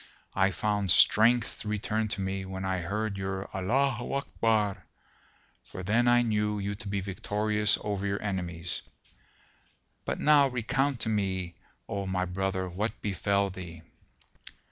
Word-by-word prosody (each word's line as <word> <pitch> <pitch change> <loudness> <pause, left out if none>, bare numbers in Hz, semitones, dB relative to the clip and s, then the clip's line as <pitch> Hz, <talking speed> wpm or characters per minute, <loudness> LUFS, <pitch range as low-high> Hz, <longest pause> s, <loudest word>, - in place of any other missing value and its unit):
I 95 0 +3
found 100 +1 -1
strength 115 +6 +5
return 105 +1 -1
to 105 -2 -3
me, 95 0 -2
when 95 0 -5
I 95 -1 0
heard 100 +3 -2
your 95 0 -3
'Allaho 120 +5 0
Akbar,' 110 -6 0 0.8
for 95 - -8
then 115 +6 +2
I 120 0 +5
knew 105 -2 0
you 100 0 -2
to 105 +1 -8
be 100 0 -1
victorious 105 +2 0
over 100 -1 -2
your 100 0 -1
enemies. 90 -4 -3 1.2
But - - -3
now 145 -2 +6
recount 130 +1 0
to - - 0
me, 95 -4 -1 0.3
O 100 -1 -3
my 95 -1 0
brother, 95 +1 -2
what 100 +6 -3
befel 100 0 +1
thee." 85 -3 -9
100 Hz, 140 wpm, -29 LUFS, 95-110 Hz, 1.2 s, now